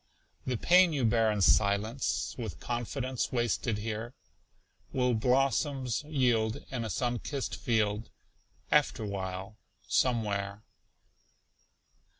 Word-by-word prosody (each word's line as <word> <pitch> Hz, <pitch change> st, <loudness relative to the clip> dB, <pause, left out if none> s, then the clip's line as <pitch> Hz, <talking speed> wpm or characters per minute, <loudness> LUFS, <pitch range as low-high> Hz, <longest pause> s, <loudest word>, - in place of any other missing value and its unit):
The 125 Hz, -2 st, 0 dB
pain 180 Hz, +5 st, +5 dB
you 135 Hz, -5 st, +1 dB
bear 115 Hz, -1 st, +3 dB
in 105 Hz, -1 st, -1 dB
silence, 100 Hz, +6 st, +2 dB
For 115 Hz, -3 st, -4 dB
confidence 125 Hz, +4 st, -3 dB
wasted 120 Hz, -2 st, 0 dB
here 110 Hz, +3 st, -5 dB, 0.8 s
Will 125 Hz, -1 st, +1 dB
blossoms 130 Hz, +2 st, +1 dB
yield 120 Hz, -7 st, +1 dB
in 125 Hz, -3 st, -2 dB
a 110 Hz, -, -4 dB
sun 120 Hz, +5 st, -1 dB
kissed 140 Hz, +2 st, -4 dB
field, 110 Hz, -2 st, 0 dB, 0.6 s
Afterwhile, 100 Hz, -7 st, -1 dB, 0.3 s
somewhere. 105 Hz, -4 st, 0 dB
115 Hz, 100 wpm, -30 LUFS, 105-130 Hz, 0.8 s, pain